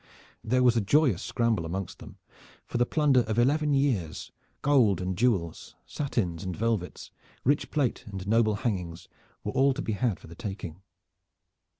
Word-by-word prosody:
There 125 +3 +2
was 120 -1 +5
a 115 - +3
joyous 125 - +3
scramble 115 -6 0
amongst 90 +2 -5
them, - - -12 0.5
for 120 - -3
the 120 - +3
plunder 145 -4 +3
of 110 0 -2
eleven 145 +4 +3
years, 120 - -1 0.3
gold 125 -10 +4
and 90 0 -2
jewels, 100 -7 -1
satins 100 - -2
and 90 -3 -4
velvets, 110 -5 -2 0.3
rich 145 +3 +1
plate 140 -6 0
and 95 -2 -7
noble 110 0 +3
hangings 90 -6 -3 0.4
were - - -2
all 135 0 +3
to 145 - -3
be 110 - -2
had 105 -5 0
for - - -14
the 85 - -11
taking. 95 -5 -7
110 Hz, 165 wpm, -28 LUFS, 95-130 Hz, 0.5 s, was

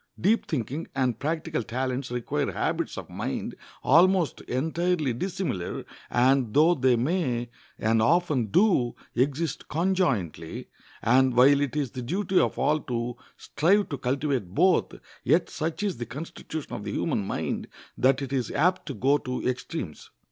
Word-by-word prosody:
Deep 215 +6 +2
thinking 145 - -3
and 125 -4 0
practical 160 -1 -2
talents 130 +3 -3
require 125 -1 -2
habits - - -2
of - - -6
mind - - -4 0.3
almost 175 +1 +4
entirely 160 +1 0
dissimilar, 165 - -3 0.2
and 125 -2 +2
though 160 +4 +6
they 130 -5 +3
may, 120 -3 -1 0.3
and 110 +1 +2
often 150 -3 +2
do, 170 - +3 0.2
exist 140 +4 -1
conjointly, 145 - -1 0.4
and 130 +2 +4
while 140 +3 +6
it 140 -2 -1
is 145 -5 -1
the 130 - -6
duty 185 +8 +1
of - - +1
all 155 +1 +2
to 120 -3 -3 0.2
strive 195 +6 +2
to 140 - -3
cultivate 130 -7 -1
both, 185 -1 +3 0.3
yet - - +2
such 160 +5 -3
is 200 -8 -1
the 120 - -4
constitution 150 +1 -7
of 115 -4 -5
the 100 -1 -4
human 135 -11 0
mind 95 - -3 0.3
that 135 +2 +2
it 135 0 -5
is 130 -3 0
apt 180 +3 +1
to 140 - -4
go 140 +3 +3
to 125 -2 -3
extremes. 125 - -4
135 Hz, 150 wpm, -26 LUFS, 125-165 Hz, 0.4 s, though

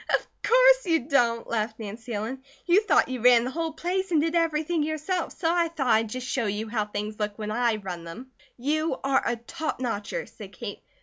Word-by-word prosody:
"Of - - -16 0.2
course - - +5
you 325 -3 +3
don't," 240 -4 +2
laughed 220 -1 -2
Nancy 225 +3 -7
Ellen. 230 +6 -4 0.2
"You 360 +4 +5
thought 420 - +3
you 255 -2 -4
ran 245 -1 +6
the 255 - -3
whole 330 +2 -2
place 375 +4 -2
and 325 -3 +3
did 325 +2 0
everything 330 -1 +1
yourself, 315 +4 -2
so 330 - -3
I 345 -1 +2
thought 320 -5 -3
I'd 225 -2 +3
just 255 +3 -5
show 245 -4 0
you 210 +2 -2
how 215 -2 0
things 210 +1 -5
look 210 -1 -2
when 215 -1 -4
I 235 0 +2
run 185 -5 -6
them." 235 +11 -9 0.3
"You 300 +3 0
are 270 0 +3
a 240 - 0
top 240 +7 -5
notcher," 245 - -3
said - - -12
Kate. - - -7
255 Hz, 210 wpm, -26 LUFS, 220-325 Hz, 0.3 s, ran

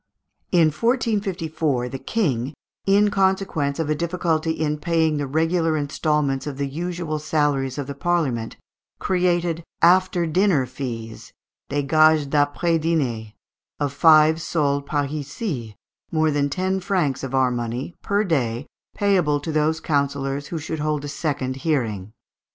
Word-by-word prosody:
In 170 -3 +5
1454 175 - 0
the 135 - -6
King, 135 - -1 0.3
in 205 +1 +4
consequence 190 -7 +1
of 160 -2 -1
a 155 - +2
difficulty 165 0 -1
in 155 -2 -1
paying 160 -2 +1
the 145 -1 -2
regular 160 +2 +1
instalments 145 -2 0
of 140 -2 -5
the 140 - -1
usual 165 +2 -3
salaries 145 -3 0
of 145 - -3
the 140 - -5
Parliament, 140 -8 -1 0.4
created 175 -2 0 0.2
"after 180 0 +4
dinner 170 -4 +2
fees" 120 -3 -7 0.4
(des 145 0 0
gages 155 +1 +4
d'après 145 +4 +1
dînées) 125 -10 -1 0.4
of 145 -2 -1
five 160 +1 +5
sols 145 -3 0
parisis 145 - -3 0.4
more 155 -1 +2
than 145 -1 +1
ten 185 +5 -1
francs 175 -9 -1
of 135 0 -3
our 130 -1 +3
money 120 +6 -3
per 200 +1 +1
day, 130 - -1 0.3
payable 180 -8 +2
to 155 +3 -4
those 155 +1 +1
councillors 140 -2 -1
who 170 - -4
should 160 0 -4
hold 150 -1 -1
a - - -4
second 140 -3 -2
hearing. 115 - -1
150 Hz, 140 wpm, -23 LUFS, 140-170 Hz, 0.4 s, In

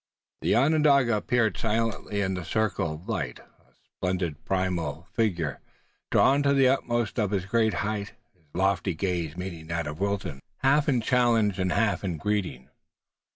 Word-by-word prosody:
The - - +2
Onondaga 140 -3 +4
appeared 110 -2 +1
silently 110 -2 -1
in 95 -1 0
the 90 -1 -4
circle 100 -3 -1
of 85 +6 -13
light, 80 - -2
a - - -24
splendid 90 -4 -3
primeval 90 -4 -2
figure, 85 - 0 0.5
drawn 140 +2 +4
to 140 0 +3
the 135 -2 +5
uttermost 120 -4 0
of 105 -3 +1
his 95 -2 -1
great 110 0 +1
height, 105 -1 -3 0.2
his 90 -4 -34
lofty 95 -1 +1
gaze 85 -3 -2
meeting 85 -3 -6
that 85 -1 -2
of 75 +2 -6
Wilton, 95 -7 -2 0.2
half 145 +2 +4
in 125 -4 +2
challenge 115 -5 +2
and 95 -1 0
half 110 0 +1
in 90 -4 -2
greeting. 90 -9 -2
100 Hz, 155 wpm, -27 LUFS, 85-115 Hz, 0.5 s, the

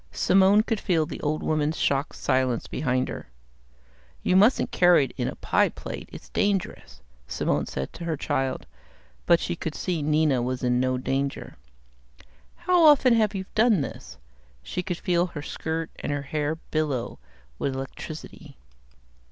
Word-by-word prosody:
Simone 195 +3 +4
could 225 -2 -1
feel 165 -5 +1
the 150 - -7
old 155 +1 -1
woman's 155 0 0
shocked 140 +1 0
silence 130 -3 0
behind 130 -2 -1
her. - - -7 1.0
"You 185 - +2
mustn't 210 +7 +4
carry 175 -5 +5
it 125 - -11
in - - -2
a - - -4
pie - - +2
plate, - - -8
it's - - -11
dangerous," 200 -3 -2 0.2
Simone - - -1
said 65 0 -5
to 170 - -7
her 160 -2 -1
child, 135 -1 -2 0.6
but 170 - +6
she 175 - -3
could 160 -2 -5
see 175 -4 -2
Nina 150 -3 +2
was 125 +1 -3
in 125 0 +2
no 130 0 +1
danger. 135 +2 -3 1.0
"How 350 0 +2
often 285 -5 +6
have 215 -3 +2
you 190 -1 -3
done 220 -5 +4
this?" - - -7 0.5
She 180 - -3
could 180 -1 -4
feel 175 0 +1
her 150 -4 -7
skirt 160 +1 -4
and - - -3
her 145 -1 -2
hair 150 +2 -2
billow 150 -6 -3 0.4
with 135 - -1
electricity. 135 +3 -8
155 Hz, 160 wpm, -25 LUFS, 135-185 Hz, 1.0 s, but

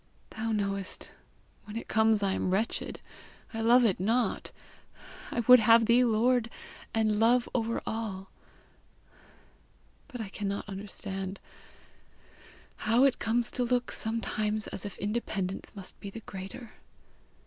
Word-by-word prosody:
Thou 225 +1 -3
knowest, 200 -2 -2 0.5
when 210 +1 -6
it - - -6
comes 220 -1 +3
I 195 -1 +2
am 185 - -1
wretched. 205 +5 -1 0.5
I 225 - -3
love 240 +2 +6
it 200 -6 +2
not. 230 +6 0 0.8
I 235 - -1
would 250 +2 +8
have 225 +1 +6
thee 240 +2 +5
lord 235 +1 +2 0.4
and 215 -2 +1
love 240 +2 +4
over 230 -1 -1
all. 210 -4 -4 1.8
But 255 -4 -8
I 215 -3 -4
cannot 200 0 -4
understand: 195 -1 -5 1.4
how 235 +5 +4
comes 235 +1 +1
it - - -8
to 250 - +2
look 245 0 0
sometimes 215 -1 -2
as - - -6
if 200 - -6
independence 200 -2 -3
must 195 -2 -9
be 200 - -7
the 225 +3 -9
greater? 210 +5 -8
220 Hz, 130 wpm, -29 LUFS, 200-235 Hz, 1.8 s, would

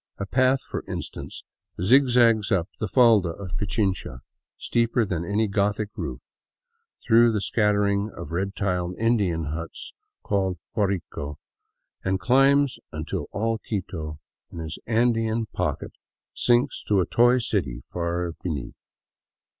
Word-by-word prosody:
A 100 - -3
path, 130 +5 +2
for - - -5
instance, - - -6 0.4
zigzags 120 0 +4
up 90 -3 +2
the 110 - -1
falda 110 -5 +5
of 90 +1 -6
Pichincha, 95 - -1 0.4
steeper 115 0 +1
than 90 -5 -2
any 105 +5 0
Gothic 105 +1 0
roof, - - -5 0.8
through 115 0 +6
the 110 - 0
scattering 100 -1 +1
of 75 - -7
red 95 +4 -2
tiled 90 -2 -1
Indian 105 -8 +1
huts 85 0 -6 0.3
called 95 -3 0 0.2
Guarico, 95 -8 -2 0.7
and 95 0 0
climbs 135 +2 +3
until 80 +1 -4
all 110 +2 -1
Quito 85 -9 -5 0.3
in 85 - -8
its 80 -1 -5
Andean 115 -1 +1
pocket 90 -6 -2 0.4
sinks 120 +3 +2
to 100 -2 +2
a 90 - +2
toy 120 +2 +4
city 80 - -1
far 85 0 -2
beneath. 75 -9 -6
100 Hz, 125 wpm, -25 LUFS, 90-115 Hz, 0.8 s, through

